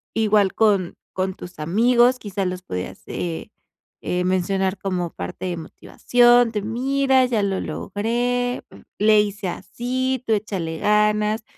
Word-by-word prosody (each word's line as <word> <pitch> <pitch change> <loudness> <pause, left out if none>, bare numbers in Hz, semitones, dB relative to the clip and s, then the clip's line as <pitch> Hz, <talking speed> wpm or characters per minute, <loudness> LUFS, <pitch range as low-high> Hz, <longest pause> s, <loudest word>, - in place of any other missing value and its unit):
igual 210 -3 +3
con 200 -5 +2 0.2
con 190 0 -1
tus 175 -3 -11
amigos, 240 +9 +3
quizás 195 -2 -3
los 180 0 -5
podías, 90 - -6
eh, 85 -4 -4 0.5
eh, 180 0 -1
mencionar 185 +1 0
como 180 -3 -2
parte 90 - -6
de 180 -2 -2
motivación, 240 +8 +3
de: 210 -2 -2
"Mira, 265 +4 +2
ya 230 -5 0
lo 195 -1 0
logré, 245 +4 -2 0.4
le 210 0 +5
hice 205 -1 -3
así, 255 +8 -3
tú 225 - +3
échale 185 -6 -3
ganas, 210 +1 +2
210 Hz, 135 wpm, -22 LUFS, 185-240 Hz, 0.5 s, le